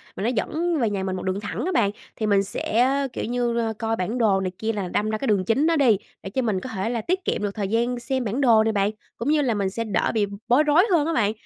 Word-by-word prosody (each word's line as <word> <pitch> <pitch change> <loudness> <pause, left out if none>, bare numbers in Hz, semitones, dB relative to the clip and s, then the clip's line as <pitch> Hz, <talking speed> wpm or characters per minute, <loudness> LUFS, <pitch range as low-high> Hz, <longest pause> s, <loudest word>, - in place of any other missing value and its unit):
mà - - -4
nó 225 - +2
dẫn 320 +8 -1
về 230 -4 +2
nhà 200 -2 -2
mình 190 -1 -2
một 185 - -5
đường 190 +1 -1
thẳng 210 +5 -4
á 370 - -1
bạn. 205 - +2 0.2
Thì 220 - -2
mình 200 -2 +3
sẽ, 235 +5 +1 0.2
kiểu - - -3
như, 235 -1 -1
coi 225 -1 0
bản 215 +5 -2
đồ 210 -5 +3
này 185 -1 -2
kia 225 +1 -1
là 200 -3 -3
đâm 210 +4 -1
ra 215 - -1
cái 270 - -4
đường 200 -4 +2
chính 265 - +2
đó 335 - +3
đi, 255 -9 +4 0.3
để 195 - -5
cho 260 +7 -1
mình 215 -6 0
có 255 - -6
thể 190 +4 -1
là 235 -2 -2
tiết 370 - -2
kiệm - - -1
được 205 - -1
thời 205 -3 -2
gian 235 +4 0
xem 260 +1 -2
bản 235 +5 -2
đồ 230 -5 +5
nè 220 - +1
bạn, 200 -1 +1 0.3
cũng 235 - -2
như 305 0 +3
là 255 -5 +1
mình 200 -2 0
sẽ 230 +4 -3
đỡ 205 -5 0
bị 215 -2 +2
b - - -11 0.2
bối 255 +5 +5
rối 305 +4 +5
hơn 320 -4 +3
á 330 - 0
bạn. 210 -8 +2
225 Hz, 305 wpm, -24 LUFS, 205-255 Hz, 0.3 s, đồ